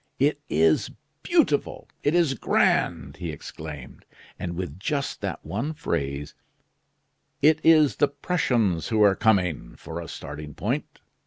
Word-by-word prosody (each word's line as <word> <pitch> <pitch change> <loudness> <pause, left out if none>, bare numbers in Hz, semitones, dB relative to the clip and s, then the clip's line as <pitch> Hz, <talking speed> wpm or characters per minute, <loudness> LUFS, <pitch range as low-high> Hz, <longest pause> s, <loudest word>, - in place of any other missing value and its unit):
"It 145 +2 +1
is 80 0 +3 0.3
beautiful! - - +1
it 145 +4 +1
is 170 -6 +3
grand!" 130 - +1
he 90 -2 -5
exclaimed. 75 -2 -9 0.4
"And 85 -1 -4
with 90 -2 -5
just 140 +6 -2
that - - -4
one 155 +3 -3
phrase: 70 - -3 1.1
'It 155 +1 +6
is 155 -3 +5
the 145 - +4
Prussians 125 - 0
who 110 -2 +3
are 100 -1 +5
coming,' 90 - +1
for 85 +1 -7
a 85 - -8
starting 75 0 -8
point! - - -3
95 Hz, 135 wpm, -25 LUFS, -, 1.1 s, It